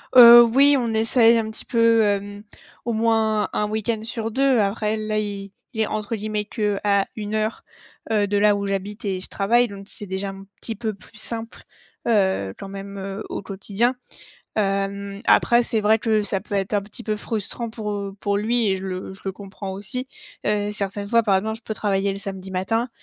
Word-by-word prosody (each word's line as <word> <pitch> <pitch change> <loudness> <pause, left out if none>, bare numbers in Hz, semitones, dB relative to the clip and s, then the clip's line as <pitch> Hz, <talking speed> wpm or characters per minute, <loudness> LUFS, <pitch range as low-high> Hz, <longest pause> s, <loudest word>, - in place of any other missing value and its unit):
Heu, 240 -1 +11
oui, 275 +5 +5
on 230 -2 -1
essaie 230 +1 +5
un 220 -1 -1
petit - - -3
peu, 230 -1 +4
hem, 205 0 -1 0.4
au 235 - -1
moins, 220 -1 +1
1 210 - 0
week-end 220 +1 -1
sur 225 0 -4
2. 270 0 +3
Après, 210 +1 0
là, 215 0 -1
il 200 -2 -4 0.2
il 220 - -1
est, 215 - +2
entre 215 +1 -3
guillemets, 210 0 -2
«qu'à 205 -2 0
1 210 0 -4
heure», 215 +1 -2 0.5
heu, 210 -2 +3
de 205 0 0
là 205 0 +4
où 200 0 -3
j'habite 200 +2 -4
et 190 -2 -1
je - - +3
travaille, 235 +5 +2
donc 200 -1 -10
c'est 205 - -6
déjà 190 +1 +1
un 195 0 -9 0.2
petit 225 - -2
peu 215 0 -3
plus 200 +2 -16
simple, 230 +1 -6 0.4
heu, 190 - +1
quand 195 - -8
même, 200 0 -8
heu, 195 +2 -5
au - - -4
quotidien. 200 +5 0 0.6
Hem, 200 0 -1
après 240 0 +5
c'est 225 -2 0
vrai 215 +1 +4
que 215 -2 +1
ça 195 -2 -1
peut 205 -1 -5
être 195 +1 -1
un 205 - +2
petit 210 +4 -8
peu 215 -2 -1
frustrant 225 +2 -3
pour, 215 -2 -5
heu, 200 -1 -4
pour 200 0 0
lui 225 +1 +1
et 190 - +1
je 190 - -8
le 185 0 -5
je 190 - -13
le 195 - -2
comprends 195 0 -8
aussi. 250 +7 -3 0.4
Heu, 210 0 0
certaines 200 0 -3
fois, 230 +1 +3
par 195 -3 +3
exemple, 220 +3 -2
je - - -15
peux 220 - -5
travailler 200 -1 0
le 195 - -5
samedi 190 -1 -6
matin 225 +7 -1
210 Hz, 210 wpm, -23 LUFS, 200-225 Hz, 0.6 s, Heu